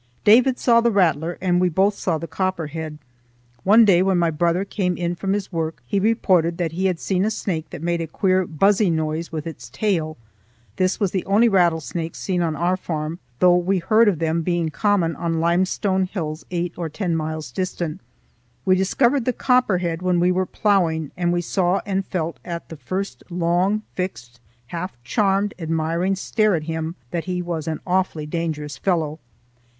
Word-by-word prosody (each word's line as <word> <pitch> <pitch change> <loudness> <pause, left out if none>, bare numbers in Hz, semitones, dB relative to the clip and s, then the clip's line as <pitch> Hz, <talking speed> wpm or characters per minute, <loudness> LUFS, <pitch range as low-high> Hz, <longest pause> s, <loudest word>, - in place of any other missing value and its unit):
David 245 +5 +5
saw 235 -1 +4
the 235 - +3
rattler, 170 -5 +1
and 180 -1 +2
we 180 - +3
both 195 +5 +2
saw 175 -4 -1
the 165 - -5
copperhead. 160 -3 -3 0.7
One 220 +4 +7
day, 185 -4 +5
when 190 -1 +2
my 170 -1 +2
brother 170 +4 +1
came 180 -3 -1
in 175 0 -1
from 195 +2 -2
his 200 -1 -3
work, 165 -2 -3
he 200 - 0
reported 185 -6 +2
that 170 -3 -1
he 185 +3 0
had 180 -3 -1
seen 190 -1 0
a 215 - +2
snake 170 -7 -3
that 150 - -8
made 170 0 0
a 165 - -3
queer 185 +2 +1
buzzy 195 +5 +3
noise 160 0 -2
with 155 -2 -4
its 165 -2 -8
tail. 165 -7 -1 0.6
This 185 0 +1
was 200 -4 +1
the 190 - -1
only 210 +4 +4
rattlesnake 170 -4 +1
seen 180 -2 -1
on 160 -2 0
our 175 +3 +1
farm, 160 -2 -4 0.2
though 180 +3 +5
we 180 +2 +1
heard 215 +6 +4
of 195 -5 +3
them 165 +1 0
being 170 -1 0
common 180 -2 +1
on 165 -2 -1
limestone 185 +3 +1
hills 160 -5 -5
eight 175 -1 -2
or 170 -2 -3
ten 170 +2 -2
miles 155 -3 -4
distant. 170 0 -3 0.6
We 185 -1 +5
discovered 240 +7 +2
the 250 - +1
copperhead 185 -12 +1
when 180 -1 +1
we 180 +1 +3
were 185 0 0
ploughing, 170 -8 +1
and 175 -1 0
we 175 0 +1
saw 180 +2 +1
and 195 -1 -1
felt 170 -3 -3
at 170 -1 -6
the 160 - -8
first 185 +9 -4
long, 180 +4 +1
fixed, 125 -11 -5 0.3
half 180 +2 -4
charmed, 195 - +1
admiring 165 +3 0
stare 215 +1 +1
at 155 - -2
him 160 +1 -3 0.2
that 170 -1 -2
he 180 -1 -2
was 170 -2 -4
an 160 -1 -3
awfully 180 -4 0
dangerous 150 -3 -4
fellow. 160 -4 0
175 Hz, 185 wpm, -22 LUFS, 165-190 Hz, 0.7 s, One